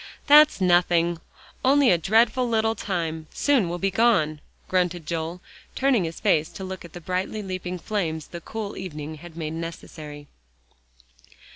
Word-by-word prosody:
"That's 300 Hz, -2 st, +7 dB
nothing; 175 Hz, -2 st, +3 dB, 0.4 s
only 275 Hz, -1 st, +5 dB
a 175 Hz, -, +4 dB
dreadful 230 Hz, +7 st, +3 dB
little 225 Hz, -1 st, +2 dB
time 165 Hz, -7 st, -3 dB
soon 265 Hz, -11 st, +2 dB
will 175 Hz, -, -3 dB
be 195 Hz, +2 st, 0 dB
gone," 175 Hz, -9 st, +2 dB, 0.3 s
grunted 180 Hz, -3 st, 0 dB
Joel, 165 Hz, +2 st, -4 dB, 0.3 s
turning 260 Hz, -9 st, +2 dB
his 165 Hz, 0 st, -6 dB
face 155 Hz, 0 st, +2 dB
to 190 Hz, -, -7 dB
look 190 Hz, 0 st, -6 dB
at 170 Hz, -, -12 dB
the 175 Hz, -, -7 dB
brightly 185 Hz, +5 st, -3 dB
leaping 185 Hz, -1 st, -4 dB
flames 165 Hz, -6 st, -3 dB
the 170 Hz, -, -9 dB
cool 215 Hz, +2 st, -6 dB
evening 155 Hz, -4 st, -6 dB
had 170 Hz, 0 st, -12 dB
made 155 Hz, -1 st, -4 dB
necessary. 155 Hz, -3 st, -8 dB
180 Hz, 150 wpm, -24 LUFS, 160-215 Hz, 0.4 s, That's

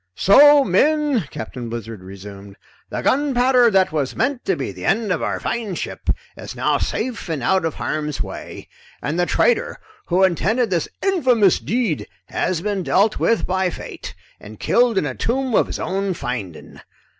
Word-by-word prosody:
"So, 285 Hz, -, +7 dB
men," 275 Hz, -, +2 dB
Captain 115 Hz, +2 st, -7 dB
Blizzard 115 Hz, -3 st, -6 dB
resumed, 100 Hz, +1 st, -11 dB, 0.3 s
"the -, -, -4 dB
gunpowder 255 Hz, -3 st, +3 dB
that 190 Hz, -4 st, +3 dB
was 145 Hz, -4 st, -2 dB
meant 280 Hz, -3 st, -1 dB
to 390 Hz, -, +1 dB
be -, -, -4 dB
the -, -, -10 dB
end 220 Hz, -3 st, +1 dB
of 170 Hz, -, 0 dB
our -, -, -2 dB
fine 220 Hz, -6 st, -3 dB
ship -, -, -6 dB, 0.3 s
is -, -, -9 dB
now -, -, +1 dB
safe 240 Hz, -7 st, -3 dB
and 150 Hz, -6 st, -3 dB
out 190 Hz, +4 st, +2 dB
of 160 Hz, -, -2 dB
harm's 150 Hz, -2 st, -3 dB
way, -, -, -7 dB, 0.4 s
and 155 Hz, +4 st, -2 dB
the 175 Hz, -, +2 dB
traitor 485 Hz, -, +1 dB, 0.3 s
who 185 Hz, +2 st, +2 dB
intended 195 Hz, +6 st, +1 dB
this 170 Hz, -4 st, 0 dB
infamous 255 Hz, -, +3 dB
deed 190 Hz, -, -1 dB, 0.2 s
has 175 Hz, -3 st, -1 dB
been 205 Hz, 0 st, -2 dB
dealt 200 Hz, +4 st, +2 dB
with 230 Hz, -, +2 dB
by 185 Hz, 0 st, 0 dB
fate -, -, -8 dB, 0.2 s
and 105 Hz, 0 st, -12 dB
killed 240 Hz, -3 st, +2 dB
in 175 Hz, -, +2 dB
a 135 Hz, -, -3 dB
tomb 255 Hz, -, -1 dB
of -, -, +3 dB
his -, -, -5 dB
own 195 Hz, 0 st, -2 dB
finding. 120 Hz, -, -6 dB
190 Hz, 170 wpm, -21 LUFS, 150-245 Hz, 0.4 s, So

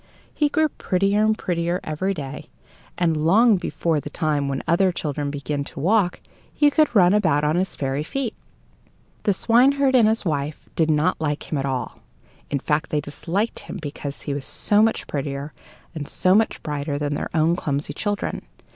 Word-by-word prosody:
He 295 Hz, -1 st, +1 dB
grew 315 Hz, +2 st, +2 dB
prettier 200 Hz, -4 st, 0 dB
and 215 Hz, 0 st, +2 dB
prettier 170 Hz, 0 st, -1 dB
every 185 Hz, +6 st, -2 dB
day, 145 Hz, 0 st, -7 dB, 0.5 s
and 165 Hz, -3 st, +1 dB
long 215 Hz, +6 st, +5 dB
before 165 Hz, -3 st, -1 dB
the -, -, -7 dB
time 150 Hz, -4 st, -1 dB
when 135 Hz, -1 st, -3 dB
other 185 Hz, +3 st, +3 dB
children 145 Hz, -4 st, -3 dB
begin 145 Hz, 0 st, -3 dB
to -, -, -9 dB
walk, 185 Hz, +3 st, +2 dB, 0.3 s
he 295 Hz, -1 st, +3 dB
could 305 Hz, -5 st, +2 dB
run 180 Hz, -2 st, +6 dB
about 160 Hz, -8 st, +2 dB
on 150 Hz, +2 st, +2 dB
his 185 Hz, +2 st, -1 dB
fairy 135 Hz, +1 st, -2 dB
feet. 240 Hz, -, -3 dB, 0.9 s
The 205 Hz, -, +4 dB
swineherd 265 Hz, +6 st, +3 dB
and 240 Hz, -4 st, +6 dB
his 220 Hz, -1 st, +1 dB
wife 150 Hz, -2 st, -3 dB
did 160 Hz, -1 st, +2 dB
not 155 Hz, +3 st, +1 dB
like 150 Hz, -1 st, -3 dB
him 150 Hz, -, 0 dB
at 135 Hz, -, -1 dB
all; 130 Hz, -2 st, -3 dB, 0.5 s
in 140 Hz, -, 0 dB
fact, 150 Hz, +2 st, -1 dB
they 150 Hz, -, 0 dB
disliked 170 Hz, +9 st, -2 dB
him -, -, -7 dB
because 145 Hz, -2 st, -6 dB
he 145 Hz, -, -3 dB
was 140 Hz, -1 st, -3 dB
so 205 Hz, +8 st, +2 dB
much 225 Hz, 0 st, +1 dB
prettier 140 Hz, +1 st, -4 dB, 0.4 s
and 150 Hz, -3 st, -5 dB
so 185 Hz, -, +2 dB
much 220 Hz, +2 st, +2 dB
brighter 145 Hz, -1 st, -3 dB
than 145 Hz, 0 st, -2 dB
their -, -, -3 dB
own 160 Hz, +2 st, +3 dB
clumsy 145 Hz, -4 st, -3 dB
children. 205 Hz, -1 st, -2 dB
165 Hz, 180 wpm, -23 LUFS, 145-205 Hz, 0.9 s, run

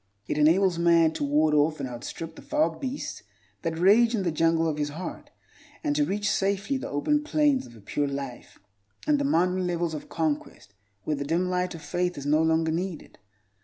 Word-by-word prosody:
It 150 Hz, -, -1 dB
enables 170 Hz, +3 st, +4 dB
man 170 Hz, -2 st, +4 dB
to -, -, -3 dB
ward 150 Hz, +2 st, +2 dB
off 150 Hz, +1 st, +2 dB
and 135 Hz, -, -3 dB
outstrip 155 Hz, +7 st, -7 dB
the -, -, -11 dB
foul 305 Hz, +1 st, 0 dB
beasts 270 Hz, +1 st, -5 dB, 0.4 s
that 160 Hz, -1 st, -2 dB
rage 225 Hz, +7 st, +5 dB
in 200 Hz, -, -1 dB
the 175 Hz, -, 0 dB
jungle 165 Hz, +1 st, +2 dB
of 155 Hz, -2 st, -1 dB
his 145 Hz, 0 st, 0 dB
heart, 160 Hz, +6 st, -7 dB, 0.5 s
and 295 Hz, -2 st, 0 dB
to 295 Hz, -, +3 dB
reach 205 Hz, -4 st, -1 dB
safely 200 Hz, +5 st, 0 dB
the -, -, -6 dB
open 295 Hz, -, +1 dB
plains 295 Hz, -3 st, +2 dB
of 120 Hz, -, -15 dB
a 110 Hz, -, -15 dB
pure 145 Hz, +8 st, -1 dB
life 140 Hz, -3 st, -6 dB, 0.5 s
and 300 Hz, -1 st, +3 dB
the -, -, 0 dB
mountain 185 Hz, -, +1 dB
levels 170 Hz, -2 st, -1 dB
of 150 Hz, -, -7 dB
conquest 150 Hz, -10 st, -3 dB, 0.3 s
where 150 Hz, -, -1 dB
the 140 Hz, -, -2 dB
dim 170 Hz, +5 st, 0 dB
light 180 Hz, -1 st, -1 dB
of 160 Hz, -, -10 dB
faith 180 Hz, 0 st, -1 dB
is 140 Hz, -, -6 dB
no 150 Hz, +2 st, +3 dB
longer 160 Hz, 0 st, +2 dB
needed. 175 Hz, 0 st, -4 dB
165 Hz, 200 wpm, -26 LUFS, 150-195 Hz, 0.5 s, rage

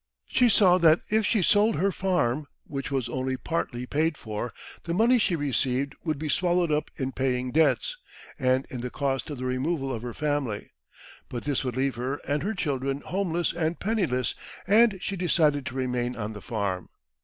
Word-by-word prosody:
She 250 Hz, -1 st, +3 dB
saw 185 Hz, -4 st, +6 dB
that 160 Hz, -1 st, +5 dB
if 220 Hz, -1 st, +3 dB
she 210 Hz, -5 st, +2 dB
sold 210 Hz, +5 st, +4 dB
her 195 Hz, +2 st, +2 dB
farm, 155 Hz, -8 st, 0 dB, 0.2 s
which 140 Hz, -2 st, -4 dB
was 135 Hz, -4 st, -1 dB
only 130 Hz, +1 st, -2 dB
partly 125 Hz, -5 st, -3 dB
paid 155 Hz, +4 st, 0 dB
for, 110 Hz, +2 st, -4 dB, 0.3 s
the 170 Hz, 0 st, -1 dB
money 235 Hz, +5 st, +4 dB
she 190 Hz, -4 st, +2 dB
received 135 Hz, -1 st, 0 dB
would 155 Hz, -3 st, -1 dB
be 155 Hz, +2 st, -4 dB
swallowed 175 Hz, +2 st, +2 dB
up 150 Hz, 0 st, 0 dB
in 130 Hz, -1 st, -2 dB
paying 130 Hz, -1 st, -1 dB
debts, 160 Hz, -, +2 dB, 0.4 s
and 130 Hz, 0 st, +2 dB
in 125 Hz, -, -4 dB
the 125 Hz, -, -3 dB
cost 135 Hz, +1 st, -2 dB
of 145 Hz, -, -5 dB
the 130 Hz, -, -4 dB
removal 135 Hz, +2 st, -1 dB
of 115 Hz, -, -4 dB
her 120 Hz, -1 st, -6 dB
family. 145 Hz, -8 st, -2 dB, 0.6 s
But 120 Hz, -, -5 dB
this 145 Hz, -3 st, 0 dB
would 125 Hz, -1 st, -3 dB
leave 135 Hz, -1 st, 0 dB
her 130 Hz, +3 st, -2 dB
and 145 Hz, 0 st, 0 dB
her 205 Hz, +4 st, -2 dB
children 140 Hz, -5 st, -1 dB
homeless 175 Hz, -3 st, -1 dB
and 165 Hz, 0 st, -1 dB
penniless, 180 Hz, -, 0 dB, 0.3 s
and 215 Hz, 0 st, +5 dB
she 195 Hz, -, -2 dB
decided 155 Hz, -6 st, +2 dB
to 125 Hz, -, -6 dB
remain 125 Hz, -1 st, -1 dB
on 110 Hz, -2 st, -4 dB
the 105 Hz, -, -9 dB
farm. 100 Hz, -6 st, -3 dB
140 Hz, 190 wpm, -27 LUFS, 125-175 Hz, 0.6 s, saw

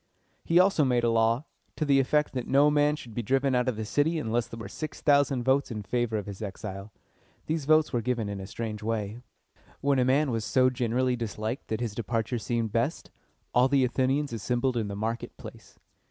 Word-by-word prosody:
He 165 Hz, -, +2 dB
also 185 Hz, -4 st, +4 dB
made 125 Hz, -3 st, +2 dB
a 115 Hz, -, +3 dB
law, 115 Hz, +4 st, +2 dB, 0.3 s
to 155 Hz, -, -1 dB
the 140 Hz, -1 st, +4 dB
effect 150 Hz, +3 st, +1 dB
that 125 Hz, -2 st, -3 dB
no 145 Hz, +2 st, +4 dB
man 150 Hz, 0 st, +3 dB
should 120 Hz, -6 st, -11 dB
be 120 Hz, -, -2 dB
driven 135 Hz, +4 st, +1 dB
out 125 Hz, +1 st, +2 dB
of 125 Hz, -, -2 dB
the 110 Hz, 0 st, -4 dB
city 145 Hz, +8 st, +1 dB
unless 120 Hz, -4 st, -1 dB
there 115 Hz, -, -9 dB
were 115 Hz, -, -6 dB
six 155 Hz, -1 st, -6 dB
thousand 140 Hz, -3 st, +3 dB
votes 135 Hz, +2 st, +2 dB
in 105 Hz, -3 st, -5 dB
favor 120 Hz, 0 st, -1 dB
of 105 Hz, -, -4 dB
his 100 Hz, -1 st, -8 dB
exile. 100 Hz, 0 st, -6 dB, 0.5 s
These 155 Hz, -2 st, -2 dB
votes 155 Hz, 0 st, +4 dB
were 120 Hz, -, +1 dB
given 120 Hz, -2 st, -1 dB
in 100 Hz, -1 st, -4 dB
a 95 Hz, -, -7 dB
strange 110 Hz, -1 st, -5 dB
way. 110 Hz, 0 st, -3 dB, 0.6 s
When 140 Hz, -1 st, +2 dB
a -, -, +4 dB
man 135 Hz, +2 st, +2 dB
was 115 Hz, -2 st, -1 dB
so 130 Hz, +4 st, +3 dB
generally 125 Hz, 0 st, 0 dB
disliked 110 Hz, +1 st, -4 dB
that 110 Hz, +1 st, -3 dB
his 115 Hz, -4 st, -2 dB
departure 115 Hz, +2 st, -2 dB
seemed 115 Hz, +1 st, -2 dB
best, 115 Hz, +8 st, -1 dB, 0.4 s
all 125 Hz, +1 st, +5 dB
the 135 Hz, -1 st, +3 dB
Athenians 130 Hz, +2 st, 0 dB
assembled 120 Hz, +3 st, -1 dB
in 110 Hz, -3 st, -1 dB
the 100 Hz, -, -5 dB
market 110 Hz, +3 st, -4 dB
place. -, -, -12 dB
120 Hz, 210 wpm, -28 LUFS, 110-135 Hz, 0.6 s, all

